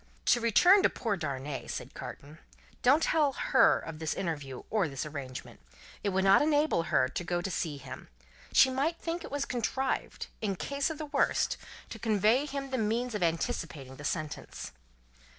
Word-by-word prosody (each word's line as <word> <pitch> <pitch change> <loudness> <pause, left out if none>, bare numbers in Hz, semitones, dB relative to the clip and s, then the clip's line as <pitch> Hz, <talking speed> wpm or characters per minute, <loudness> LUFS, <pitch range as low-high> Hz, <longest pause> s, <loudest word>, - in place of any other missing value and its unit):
"To 240 - 0
return 355 - +6
to - - +4
poor 225 -5 -2
Darnay," 140 -4 -4
said - - -6
Carton. 150 +3 -9 0.4
"Don't 280 +6 +5
tell 300 -4 +3
Her 260 -1 +4
of 160 -1 -7
this 160 0 -2
interview, 145 -8 -4
or 210 -6 +2
this 135 0 -4
arrangement. 140 -4 -7 0.4
It 205 - +1
would 190 0 +1
not 195 0 +6
enable 295 - +3
Her 130 - +3
to 175 - -4
go 175 0 -1
to 185 +2 -3
see 160 -5 -2
him. 135 -1 -9 0.4
She 260 - +6
might 290 +6 0
think 335 +1 -3
it - - -7
was 285 0 -2
contrived, 260 +2 -2 0.2
in 200 -3 -1
case 280 - -1
of 320 - -5
the 310 - -4
worse, 285 -1 +1 0.4
to 225 - -7
convey 220 +6 +2
to - - -8
him 275 -1 -4
the 260 - 0
means 230 +3 0
of 210 - -3
anticipating 160 -5 -2
the 145 - -10
sentence." 155 +1 -4
210 Hz, 185 wpm, -30 LUFS, -, 0.4 s, return